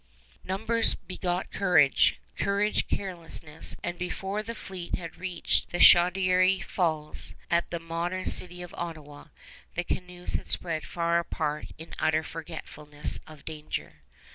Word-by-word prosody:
Numbers 225 Hz, +5 st, +1 dB
begot 180 Hz, -1 st, -2 dB
courage, 175 Hz, -8 st, +5 dB, 0.2 s
courage 200 Hz, +1 st, +1 dB
carelessness; 170 Hz, -5 st, -3 dB
and 175 Hz, 0 st, -3 dB
before 190 Hz, +3 st, -2 dB
the 230 Hz, +2 st, -5 dB
fleet 185 Hz, -5 st, -4 dB
had 170 Hz, -3 st, -7 dB
reached 180 Hz, -2 st, 0 dB
the 175 Hz, -, -2 dB
Chaudière 185 Hz, +2 st, +6 dB
Falls, 155 Hz, -4 st, -1 dB, 0.2 s
at 170 Hz, 0 st, +3 dB
the 170 Hz, -, -2 dB
modern 170 Hz, +3 st, -2 dB
city 180 Hz, 0 st, -1 dB
of 175 Hz, -, -9 dB
Ottawa, 155 Hz, -4 st, -6 dB, 0.5 s
the 180 Hz, -, +1 dB
canoes 180 Hz, 0 st, -4 dB
had -, -, -2 dB
spread 165 Hz, -3 st, -1 dB
far 170 Hz, 0 st, +2 dB
apart 150 Hz, -2 st, -2 dB
in 160 Hz, +1 st, -10 dB
utter 155 Hz, 0 st, +3 dB
forgetfulness 150 Hz, -2 st, -6 dB
of 155 Hz, -2 st, -13 dB
danger. 155 Hz, -1 st, -5 dB
175 Hz, 130 wpm, -29 LUFS, 160-185 Hz, 0.5 s, Chaudière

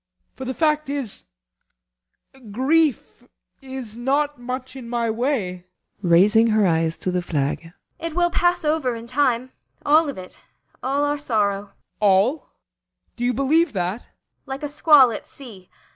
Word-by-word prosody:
For 260 Hz, -, -8 dB
the 260 Hz, 0 st, -4 dB
fact 305 Hz, -2 st, +1 dB
is, 275 Hz, -7 st, -3 dB, 1.2 s
grief 280 Hz, +6 st, +1 dB, 0.4 s
is 260 Hz, -5 st, -7 dB
not 280 Hz, +4 st, 0 dB
much 255 Hz, +1 st, -6 dB
in 250 Hz, -3 st, -9 dB
my 235 Hz, -1 st, 0 dB
way. 220 Hz, -8 st, -2 dB, 0.3 s
ASTA. 190 Hz, -, -4 dB
[Raising 205 Hz, +7 st, +5 dB
her 215 Hz, -2 st, +3 dB
eyes 165 Hz, -2 st, +1 dB
to 185 Hz, -, -2 dB
the 180 Hz, 0 st, 0 dB
flag.] 160 Hz, 0 st, -2 dB, 0.3 s
It 330 Hz, -1 st, -5 dB
will 345 Hz, -1 st, +2 dB
pass 350 Hz, -2 st, +1 dB
over 300 Hz, -5 st, 0 dB
in 230 Hz, 0 st, -8 dB
time 255 Hz, -1 st, 0 dB, 0.3 s
all 305 Hz, +1 st, +4 dB
of 280 Hz, -, -6 dB
it. 185 Hz, 0 st, -10 dB, 0.4 s
All 275 Hz, +2 st, 0 dB
our 290 Hz, 0 st, -1 dB
sorrow. 205 Hz, -7 st, 0 dB
BORGHEIM. 200 Hz, -, -32 dB
All? 210 Hz, +8 st, +2 dB, 0.7 s
Do 240 Hz, -, -5 dB
you 245 Hz, -, +2 dB
believe 300 Hz, +5 st, +2 dB
that? 185 Hz, +3 st, -2 dB
ASTA. -, -, -26 dB, 0.4 s
Like 270 Hz, +2 st, -6 dB
a 295 Hz, -, -3 dB
squall 295 Hz, -4 st, +6 dB
at 215 Hz, -, -7 dB
sea. 215 Hz, -10 st, -12 dB
250 Hz, 160 wpm, -22 LUFS, 205-290 Hz, 1.2 s, squall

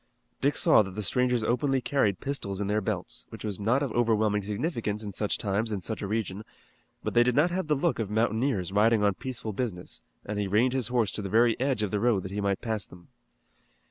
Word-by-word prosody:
Dick 140 Hz, +1 st, +2 dB
saw -, -, +6 dB
that 95 Hz, -3 st, -5 dB
the 105 Hz, -, -3 dB
strangers 125 Hz, +1 st, +1 dB
openly 135 Hz, +4 st, +1 dB
carried 115 Hz, -8 st, +1 dB
pistols 100 Hz, -9 st, -3 dB
in 100 Hz, -, -1 dB
their 105 Hz, +2 st, +1 dB
belts, -, -, -3 dB
which -, -, -9 dB
was 105 Hz, -3 st, -3 dB
not 120 Hz, +7 st, +2 dB
of 135 Hz, -, -2 dB
overwhelming 110 Hz, -3 st, +2 dB
significance 105 Hz, -, -2 dB
in 105 Hz, -, -5 dB
such 105 Hz, +1 st, -1 dB
times 105 Hz, +2 st, -1 dB
in 100 Hz, -4 st, -3 dB
such 110 Hz, -, -4 dB
a 100 Hz, -, -3 dB
region, 105 Hz, -1 st, -2 dB, 0.6 s
but -, -, -2 dB
they 120 Hz, -, +6 dB
did 120 Hz, 0 st, +2 dB
not 160 Hz, +5 st, +4 dB
have 185 Hz, -2 st, -2 dB
the 150 Hz, -, +3 dB
look 155 Hz, +1 st, 0 dB
of 110 Hz, -3 st, -2 dB
mountaineers 110 Hz, -2 st, 0 dB
riding 105 Hz, +2 st, +3 dB
on 100 Hz, -1 st, +3 dB
peaceful 115 Hz, 0 st, -5 dB
business, 100 Hz, -6 st, -4 dB, 0.2 s
and 105 Hz, 0 st, -3 dB
he 100 Hz, -, 0 dB
reined 115 Hz, +6 st, +3 dB
his 130 Hz, -4 st, +1 dB
horse 120 Hz, -4 st, +1 dB
to -, -, -4 dB
the 100 Hz, -, -4 dB
very 115 Hz, +3 st, +4 dB
edge 130 Hz, -4 st, 0 dB
of 100 Hz, -, -1 dB
the 105 Hz, -, 0 dB
road 110 Hz, -4 st, +2 dB
that 95 Hz, -, -6 dB
he 105 Hz, +1 st, -2 dB
might 100 Hz, -1 st, 0 dB
pass 110 Hz, -3 st, -1 dB
them. 90 Hz, -1 st, -12 dB
110 Hz, 235 wpm, -28 LUFS, 100-125 Hz, 0.6 s, saw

